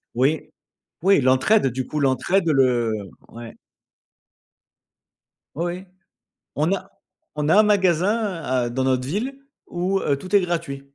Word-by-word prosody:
Oui. 150 +4 0 0.5
Oui, 195 -4 +5
l'entraide 135 +7 +3
du 130 +1 -4
coup, 150 - -3
l'entraide 165 +7 +1
le 125 -5 +2 0.4
ouais. 115 0 -10 2.0
Oui, 170 +3 -2
oui. 180 +2 -5 0.7
On 155 +5 +1
a 195 - -5 0.4
on 150 0 -1
a - - +5
un 215 - +7
magasin 195 -1 +1
à 125 -1 -1
dans 130 +2 -2
notre 130 -1 0
ville 250 - -3 0.3
où 185 +2 -1
heu, 140 -1 0
tout 185 +7 -3
est 200 - +6
gratuit. 170 -6 -3
155 Hz, 135 wpm, -22 LUFS, 130-190 Hz, 2.0 s, un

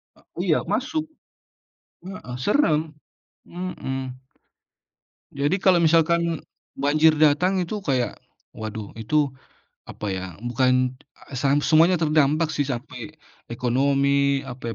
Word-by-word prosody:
E - - -23 0.2
oh - - 0
iya - - +3
masuk, 315 -1 -1 1.0
heeh, 185 -10 -7
serem, 160 - +3 0.8
mhm. 135 -7 -4 1.3
Jadi 145 +6 0
kalau 185 -2 +5
misalkan 165 0 +2 0.3
banjir 155 +3 +3
datang 155 +6 +3
itu 185 +4 -2
kayak, 130 -9 -1 0.3
waduh 110 -1 -7
itu, 145 +4 +1 0.5
apa 105 - -7
ya 95 -1 -3 0.2
bukan, 125 +1 +1 0.3
eee, 135 - -8
sang 140 +2 +2
semuanya 165 +4 +5
terdampak 155 +1 +2
sih 145 -2 -1
sampai, 130 +2 -6 0.3
ekonomi 140 +3 +1
apa 120 -2 -6
145 Hz, 110 wpm, -23 LUFS, 125-160 Hz, 1.3 s, kalau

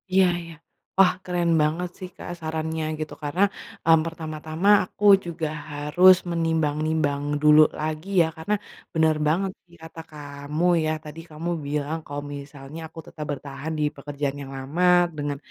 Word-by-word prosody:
Iya 190 0 +5 0.2
iya. 165 -1 -10 0.4
Wah, 195 -2 +6
keren 175 -2 0
banget 165 +4 0
sih, 185 - -7
Kak, - - -8
sarannya 160 0 -3 0.2
gitu. 155 -1 -4
Karena, 150 +6 -1 0.4
mmm, 165 0 +6
pertama-tama 160 +2 -2 0.2
aku 210 - -5 0.2
juga 165 -2 -3 0.2
harus 150 +6 +5
menimbang-nimbang 155 -3 0 0.2
dulu 150 0 +7 0.2
lagi 155 +4 -3
ya 165 - +3
karena 160 +6 -2 0.4
bener 160 -1 +3
banget 185 +5 +1
sih 170 -1 -20
kata 165 0 -9
kamu 145 +2 -4 0.2
ya, 155 - +1
tadi 155 +1 -9
kamu 160 +2 -5 0.2
bilang 150 +2 -2
kalo 145 0 -5 0.2
misalnya 140 +1 -9
aku 165 - -12
tetap 150 - -7
bertahan 140 +2 -6
di - - +1
pekerjaan 145 0 -3
yang 135 - -9
lama, 140 +7 -2 0.3
dengan 145 -1 -2
155 Hz, 150 wpm, -24 LUFS, 145-165 Hz, 0.4 s, dulu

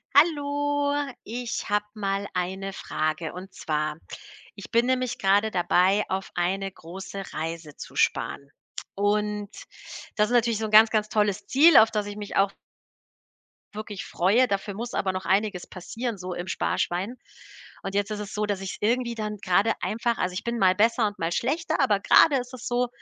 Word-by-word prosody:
Hallo. 290 -2 +2 0.3
Ich 235 -1 -4
habe 210 0 +1
mal 200 -2 -2
eine 190 +2 -3
Frage, 155 -1 -3
und 185 +1 -9
zwar 150 -1 -2 0.6
ich 200 - -10
bin 235 +1 +3
nämlich 255 -1 0
grade 200 +3 +3
dabei, 185 +2 +3
auf 190 0 -3
eine 195 +2 -1
große 190 +3 -8
Reise 160 -2 -5
zu - - -10
sparen. 140 0 0 0.5
Und 210 0 0 0.6
das 210 -1 +2
ist - - -2
natürlich 235 -2 +3
so 220 - -2
'n 215 - -5
ganz, 220 +1 +8
ganz 215 -1 0
tolles 210 -2 0
Ziel, 315 +6 +7
auf 220 - +7
das 210 -2 -1
ich 205 - -6
mich 205 -1 -6
auch 195 0 +3 1.2
wirklich 210 -2 -6
freue. 210 +9 +3
Dafür 200 -1 -2
muss 235 +4 -6
aber 190 - 0
noch 185 -1 -5
einiges 195 0 0
passieren 230 +5 -5
so 180 0 -5
im 175 +1 -5
Sparschwein. 190 +4 -1 0.7
Und 195 0 -4
jetzt 205 +1 0
ist 210 - -3
es 210 0 -6
so, 210 0 -1
dass 200 -2 -2
ich's 190 - -5
irgendwie 235 +2 +1
dann 210 -1 -4
grade 195 +4 +2
einfach 230 +2 -1
also, 180 0 -1
ich 185 - -4
bin 235 0 -2
mal 185 -4 +4
besser 225 +2 +3
und 205 - -7
mal 165 +1 -1
schlechter, 315 - -1
aber 215 -7 +3
grade 280 +7 +6
ist 250 0 -5
es 255 - -7
so, 245 0 +1
205 Hz, 180 wpm, -26 LUFS, 190-235 Hz, 1.2 s, ganz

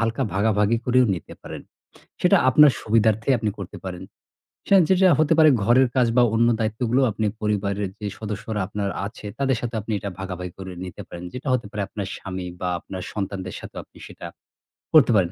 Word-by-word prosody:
হালকা 115 0 0
ভাগাভাগি 105 +2 +2
করেও 125 0 +4
নিতে 85 - -9
পারেন। - - -8 0.6
সেটা - - +5
আপনার 145 +2 +7
সুবিধার্থে 110 +1 +1
আপনি 110 -1 -1
করতে 95 -2 -7
পারেন। 90 -1 -6 0.6
সেন 195 -1 +6
যেটা 190 0 +5
হতে 155 0 +3
পারে 155 -1 +7
ঘরের 125 +3 +4
কাজ 125 -2 +4
বা 125 - +6
অন্য 115 +1 +4
দায়িত্বগুলো 115 +3 0
আপনি 105 +1 -2
পরিবারের 100 -1 -1
যে 105 - -4
সদস্যরা 105 0 -4
আপনার 100 0 -3 0.2
আছে, 105 - -9
তাদের 135 -2 +1
সাথে 120 -1 -4
আপনি 110 +2 -5
এটা 100 - -5
ভাগাভাগি 90 -2 -6
করে 95 -1 -7
নিতে 95 +3 -8
পারেন। 85 +1 -8
যেটা 130 +2 -5
হতে 120 -4 -1
পারে 105 - -3
আপনার 100 -2 -5
স্বামী 95 -1 -6
বা 90 - -1
আপনার 95 +1 -8
সন্তানদের 95 -2 -4
সাথেও - - -8
আপনি - - -20
সেটা - - -10 0.7
করতে 130 -5 +7
পারেন। 90 -2 +1
105 Hz, 185 wpm, -23 LUFS, 95-120 Hz, 0.7 s, আপনার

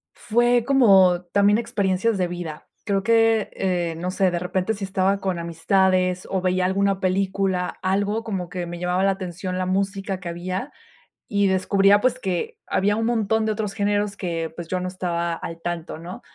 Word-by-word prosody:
Fue 240 +1 +2
como 195 -10 +5
también 200 +1 +4
experiencias 220 -2 0
de 180 -2 +1
vida. 175 -3 -7 0.2
Creo 195 -1 0
que, 225 -1 +3
eh, 175 -3 -1
no 180 +2 -3
sé, 190 -1 +2
de 175 - -1
repente, 185 +4 -1
si 205 -2 -7
estaba 190 +1 +1
con 185 -3 -2
amistades, 185 +2 +1
o 190 - 0
veía 185 0 +1
alguna 195 +1 +1
película, 190 -1 0
algo 205 +4 0
como 190 -5 -4
que 180 -1 -4
me 175 0 -7
llamaba 180 +1 0
la 195 - +4
atención 185 -1 -4
la 185 - -1
música 195 0 -1
que 180 -2 -6
había, 185 +9 -4 0.6
y 200 -1 +2
descubría, 195 +2 +3
pues, 255 +1 +1
que 215 - -3
había 205 +2 +1
un 225 +1 -1
montón 220 -1 +1
de 220 - +1
otros 210 -2 -3
géneros 205 0 0
que, 165 -3 -3
pues, 170 -1 -7
yo 185 +2 -1
no 180 - -3
estaba 170 -2 -2
al 165 0 -7
tanto, 170 -2 -4
¿no?, 175 +3 -8
190 Hz, 185 wpm, -23 LUFS, 180-205 Hz, 0.6 s, como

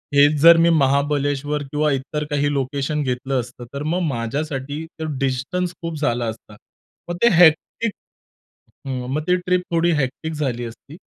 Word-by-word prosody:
हेच 145 +1 +6
जर, 170 +1 +9
मी 165 +1 +4
महाबळेश्वर 145 0 +1
किंवा 150 0 +1
इतर 140 +3 -2
काही 145 -1 +1
लोकेशन 140 +2 -1
घेतलं 130 +1 -1
असतं, 120 0 -7
तर 140 +1 -4
मग 170 +4 -1
माझ्यासाठी 140 +4 -3
तर 160 - -3
डिस्टन्स 135 +7 -1
खूप 165 -1 -4
झाला 120 -5 0
असता. 110 -1 -7 0.5
मग 175 - -2
ते 235 - +7
हेक्टिक 175 +7 +4 1.0
हं, 125 -2 -3
मग 155 - 0
ती 180 - +4
ट्रिप 180 0 +3
थोडी 170 +1 +2
हेक्टिक 150 +5 -4
झाली 130 -6 -2
असती. 125 +7 -11
145 Hz, 155 wpm, -21 LUFS, 130-160 Hz, 1.0 s, जर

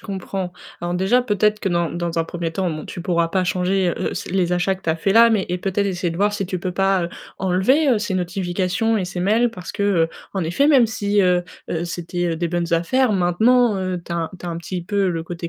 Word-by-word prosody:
comprends. 190 -2 -5 0.3
Alors 175 0 -2
déjà 195 +8 +3
peut-être 210 -2 +1
que, 195 - -2
dans 170 -2 0
dans 170 -1 -3
un 165 - +3
1er 165 -1 -4
temps, 185 0 -1
bon, 155 0 -6
tu 175 - -7
pourras 170 -2 +1
pas 185 +2 0
changer, 180 +1 +1
heu - - -2
heu, - - -6
c - - -5
les 180 -2 +1
achats 180 +2 +1
que - - -22
tu - - -5
as - - +1
faits 195 +4 0
là. 230 0 +7
Mais 210 -4 +2
et 180 +1 -2
peut-être 195 +2 -1
essayer 180 -2 -1
de - - -6
voir 205 +3 +2
si 195 -2 -2
tu 185 -1 -4
peux 185 +1 -2
pas, 195 -1 +2
heu, - - -3 0.3
enlever, 195 - +2
heu, 240 -5 +4
ces 205 -2 -2
notifications 185 +4 0
et 190 - -1
ces 180 0 -6
mails, 220 +6 +2
parce 180 -6 -8
que, 200 - -3
heu, 175 -5 +2 0.2
en 190 -3 -1
effet 275 - +2
même 260 -6 +6
si, 205 -2 0
heu 180 -1 +3 0.3
heu, 170 0 -2
c'était, 175 +1 -3
heu, 165 - -1
des 170 +1 -1
bonnes 170 0 -2
affaires, 215 +9 +2
maintenant, 215 +5 +3
heu, 185 -1 -2
tu 170 - -6
as 165 -1 -2
tu 175 - -8
as - - -2
un 165 - -3
petit 175 +1 -5
peu 200 -1 +1
le 165 -2 -2
côté 170 0 -6
185 Hz, 265 wpm, -21 LUFS, 175-205 Hz, 0.3 s, là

